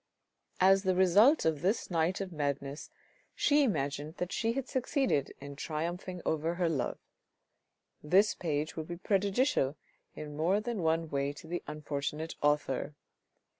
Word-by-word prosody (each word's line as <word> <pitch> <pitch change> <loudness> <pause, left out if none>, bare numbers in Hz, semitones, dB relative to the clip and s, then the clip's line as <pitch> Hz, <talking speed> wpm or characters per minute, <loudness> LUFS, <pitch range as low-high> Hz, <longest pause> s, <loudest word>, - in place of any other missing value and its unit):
As 195 +1 +6
the 190 -2 +1
result 200 - +5
of 155 -3 +1
this 195 +2 0
night 170 +3 +1
of 190 -2 -4
madness, 140 -2 -3 0.5
she 295 0 +4
imagined 150 - -1
that 180 +1 -3
she 225 +3 0
had 270 0 -3
succeeded 260 - 0
in 140 0 -8
triumphing 170 +5 -4
over 160 +2 0
her 175 -1 +1
love. 135 -6 -1 1.0
This 190 +7 +4
page 155 -2 -2
will 160 - -3
be 175 +1 -6
prejudicial 195 - +1 0.4
in 150 -1 -7
more 175 +7 +2
than 225 -2 -3
one 160 0 0
way 140 0 -1
to 145 - -12
the 175 +2 -3
unfortunate 150 +1 -4
author. 145 -1 0
165 Hz, 145 wpm, -31 LUFS, 150-195 Hz, 1.0 s, As